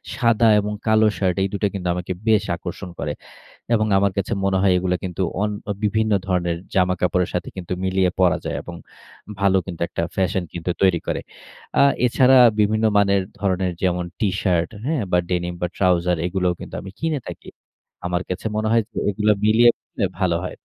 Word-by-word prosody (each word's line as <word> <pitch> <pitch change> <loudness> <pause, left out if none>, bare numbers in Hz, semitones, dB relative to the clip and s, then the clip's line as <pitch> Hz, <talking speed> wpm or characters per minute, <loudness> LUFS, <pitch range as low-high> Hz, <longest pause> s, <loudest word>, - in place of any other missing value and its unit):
সাদা 115 -2 +3
এবং 105 +1 -2
কালো 110 0 +5
শার্ট, 90 -2 +1
এই - - +1
দুটা 100 0 0
কিন্তু 90 -2 -4
আমাকে 90 +1 -3
বেশ 110 -3 +4
আকর্ষণ 90 +1 -7
করে। 75 - -2 0.6
এবং 110 -1 +3
আমার 100 0 +2
কাছে 100 - -1
মনে 95 -1 +2
হয় 95 -2 +4
এগুলো 90 0 0
কিন্তু, 90 0 -4 0.2
অন 105 - +1 0.3
বিভিন্ন 110 +1 +1 0.2
ধরনের 90 -2 0 0.2
জামাকাপড়ের 90 -1 +1
সাথে 90 - -2
কিন্তু, 90 -1 -5
মিলিয়ে 95 -1 +2
পরা 90 -3 +4
যায় - - -2
এবং - - -8 0.7
ভালো 95 -1 +4
কিন্তু, 90 -3 -7
একটা 85 - -3
ফ্যাশন 95 -1 +1
কিন্তু 85 +1 -3
তৈরি 95 -3 +4
করে। - - -1 0.6
আ - - +7 0.2
এছাড়া 130 +2 +5 0.2
বিভিন্ন 110 +1 +2
মানের, 100 -1 +3 0.2
ধরনের 95 -2 0
যেমন 90 -1 +1
টিশার্ট, 95 -5 0 0.2
হ্যাঁ? 150 -5 0
বা 90 - +4
ডেনিম 90 -1 -1
বা 90 - +1
ট্রাউজার 90 -2 +2
এগুলোও 90 -1 0
কিন্তু, - - -8
আমি 95 - -9
কিনে 160 -2 -1
থাকি। - - -9 0.6
আমার 90 0 -1
কাছে 90 +4 -5
মনে 110 0 0
হয় 115 -1 +3
যে - - -12
এগুলো 105 +1 +2
মিলিয়ে 115 +2 +6
পরলে - - -4
ভালো 90 -3 +1
হয়। 90 - -5
95 Hz, 180 wpm, -22 LUFS, 90-105 Hz, 0.7 s, আ